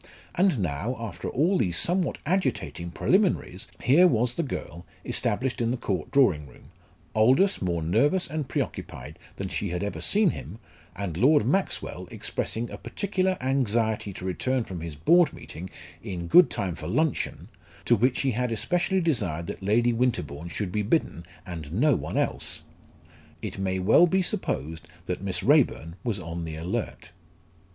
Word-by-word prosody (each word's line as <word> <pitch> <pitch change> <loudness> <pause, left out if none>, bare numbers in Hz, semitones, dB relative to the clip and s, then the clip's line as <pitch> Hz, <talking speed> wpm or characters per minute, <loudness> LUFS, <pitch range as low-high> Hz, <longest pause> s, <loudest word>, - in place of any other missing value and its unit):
And 185 -4 +3
now, 95 - -2
after 115 -3 -5
all 175 +8 +2
these 90 -5 +1
somewhat 175 - +1
agitating 165 - -1
preliminaries, 175 - +1 0.2
here 150 +9 +6
was 120 -4 +1
the 170 - -1
girl 85 - -5 0.2
established 125 +4 -1
in 115 - +1
the 125 - 0
Court 95 -8 -3
drawing 95 - +3
room, 60 - -18 0.4
Aldous 130 - +4
more 85 -3 -1
nervous 145 - +2
and 150 -2 -4
preoccupied 75 +4 -4 0.2
than 100 - -4
she 100 +1 -2
had 90 +2 -2
ever 100 - -4
seen 205 -4 +3
him, 90 +9 -8 0.4
and 90 -5 -4
Lord 145 - +4
Maxwell 195 0 -1
expressing 115 +2 -3
a - - -7
particular 190 -2 -1
anxiety 115 -5 0
to 90 - -8
return 125 +7 0
from 90 -6 -7
his 80 -2 -6
Board 170 - +4
meeting 90 +3 -9 0.3
in 85 -3 -5
good 175 - +7
time 95 -3 -2
for 85 - -7
luncheon, 155 +2 -1 0.4
to 120 - +5
which 125 +4 +2
he 135 - +1
had 125 +1 -1
especially 180 - +1
desired 100 - 0
that - - -6
Lady 115 +5 +2
Winterbourne 85 - -1
should 90 +3 -3
be 105 - 0
bidden, 100 - -1 0.2
and 80 -5 -7
no 130 - +3
one - - -4
else! - - -1 0.8
It - - -5
may 95 -1 0
well 110 - +5
be 190 +2 +2
supposed 80 - -3 0.2
that 90 0 -3
Miss 95 -2 -2
Raeburn 80 +3 +3
was 115 -5 -1
on 85 -1 -5
the 80 -1 -5
alert. 85 +2 -4
110 Hz, 160 wpm, -26 LUFS, 90-145 Hz, 0.8 s, good